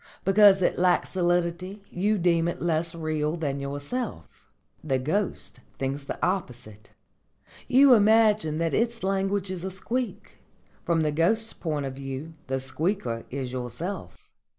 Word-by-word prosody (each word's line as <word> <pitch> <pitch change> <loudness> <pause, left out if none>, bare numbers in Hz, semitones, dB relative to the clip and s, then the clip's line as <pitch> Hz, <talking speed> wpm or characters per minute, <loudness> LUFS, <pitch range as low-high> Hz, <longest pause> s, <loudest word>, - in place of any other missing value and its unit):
Because 195 -1 +6
it - - +1
lacks 180 0 +2
solidity 175 +2 -1
you 205 +4 +1
deem 170 -2 +2
it 170 - -3
less 170 0 0
real 155 0 -1
than 140 -4 -2
yourself. 145 - -4 0.6
The 135 -4 +1
ghost 170 +10 -2 0.2
thinks 135 +1 -3
the - - -5
opposite. 120 - -4 0.8
You 265 +1 +7
imagine 215 -7 +4
that 165 0 0
its 235 -1 0
language 195 0 0
is 180 -2 -5
a 190 - -2
squeak. 235 +6 -4 0.4
From 170 -2 +1
the 155 -1 +1
ghost's 220 +9 +2
point 150 -4 -3
of 135 - -4
view 135 +4 -6
the 135 0 -1
squeaker 130 - -2
is 130 -1 -4
yourself. 130 - -5
170 Hz, 140 wpm, -26 LUFS, 140-195 Hz, 0.8 s, You